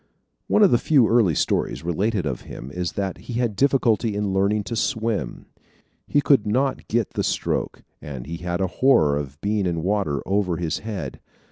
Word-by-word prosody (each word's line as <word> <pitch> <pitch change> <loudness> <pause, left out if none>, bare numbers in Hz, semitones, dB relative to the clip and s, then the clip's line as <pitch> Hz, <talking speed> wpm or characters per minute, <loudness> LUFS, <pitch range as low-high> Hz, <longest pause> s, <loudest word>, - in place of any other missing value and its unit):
One 210 - +4
of 200 - +6
the 120 - +4
few 130 -3 +4
early 110 -9 +3
stories - - 0
related 95 +3 0
of 65 -4 -3
him 65 - -9
is 90 +1 -3
that 95 -2 -3
he 120 - -8
had 120 -3 0
difficulty 120 -4 +2
in 100 -2 -1
learning 100 +2 +1
to 115 - -5
swim. 110 0 -2 0.6
He 145 - +2
could 135 -8 +3
not 130 +5 0
get 115 -1 0
the - - -2
stroke - - -2 0.2
and 65 -5 -7
he 85 +3 -5
had 90 +1 -3
a - - +2 0.2
horror 80 - +5
of 70 -1 -5
being 100 -2 0
in 85 -2 -2
water 95 -7 0
over 95 -3 0
his 85 -2 -2
head. 110 -2 -6
100 Hz, 190 wpm, -23 LUFS, 85-115 Hz, 0.6 s, of